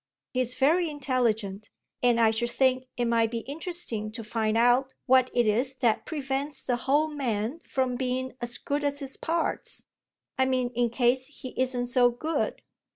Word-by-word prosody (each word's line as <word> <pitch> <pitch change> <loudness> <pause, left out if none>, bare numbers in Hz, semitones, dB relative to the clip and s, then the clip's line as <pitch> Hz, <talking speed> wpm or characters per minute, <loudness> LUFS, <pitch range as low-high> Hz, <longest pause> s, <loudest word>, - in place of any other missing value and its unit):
He's 250 -1 +2
very 325 +5 +3
intelligent, 230 -8 -1 0.3
and 240 -1 +3
I 225 -1 +5
should 240 +2 -1
think 260 0 +2
it 240 - +1
might 230 -1 +2
be 230 0 -3
interesting 280 - -3
to 230 -1 -6
find 220 0 0
out 245 +3 +3
what 255 0 +5
it 240 -1 +2
is 245 +5 +1
that 235 -4 +1
prevents 275 -1 -3
the 250 - +1
whole 285 +5 +2
man 250 -2 -2
from 255 -2 0
being 260 0 -2
as 240 +1 -2
good 290 +1 -2
as 285 0 0
his 275 -2 -5
parts. 335 +9 -1 0.6
I 260 - +4
mean 255 -2 +1
in 240 0 +1
case 250 +2 +2
he 280 -2 -9
isn't 255 -1 0
so 245 0 +4
good." 310 +7 -2
255 Hz, 170 wpm, -27 LUFS, 235-275 Hz, 0.6 s, I